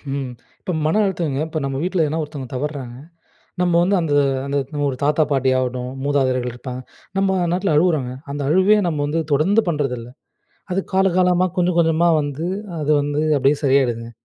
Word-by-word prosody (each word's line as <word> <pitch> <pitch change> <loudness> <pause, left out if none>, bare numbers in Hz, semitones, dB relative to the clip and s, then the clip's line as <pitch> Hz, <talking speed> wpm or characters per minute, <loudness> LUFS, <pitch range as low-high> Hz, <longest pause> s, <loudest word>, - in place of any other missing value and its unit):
ம். 135 -3 -4 0.3
இப்ப 180 - -3
மன 160 +8 +2
அழுத்தங்க 165 -7 -1
இப்ப 160 0 -3
நம்ம 135 -1 -3
வீட்ல 180 -2 +1
எதுனா 155 +2 -2
ஒருத்தவங்க 145 -4 -7
தவறுறாங்க. 135 -3 -4 0.7
நம்ம 180 -1 +2
வந்து 195 +3 +2
அந்த 160 -3 -1 0.3
அந்த 140 +1 -2 0.3
ஒரு 130 - -3
தாத்தா, 150 +2 +3
பாட்டி 135 -1 +2
ஆகட்டும். 125 0 -2
மூதாதையர்கள் 130 -3 0
இருப்பாங்க. 125 0 -7 0.4
நம்ம 190 -1 +2
நாட்டுல 180 -3 +1
அழுவுறாங்க. 150 -6 +2 0.2
அந்த 145 0 -3
அழுவே 190 +5 +4
நம்ம 155 -3 -2
வந்து 160 +3 -1
தொடர்ந்து 190 +10 +3
பண்றதில்ல. 130 -7 -2 0.6
அது 185 - +1
காலகாலமா 185 -1 +3
கொஞ்சம் 180 -1 +1
கொஞ்சமா 165 +1 +3
வந்து, 145 +2 -4 0.4
அது 150 - +1
வந்து 145 +1 -1 0.2
அப்பிடியே 140 +2 +2
சரியாகிடுதுங்க. 120 -4 +1
150 Hz, 160 wpm, -20 LUFS, 135-175 Hz, 0.7 s, அழுவே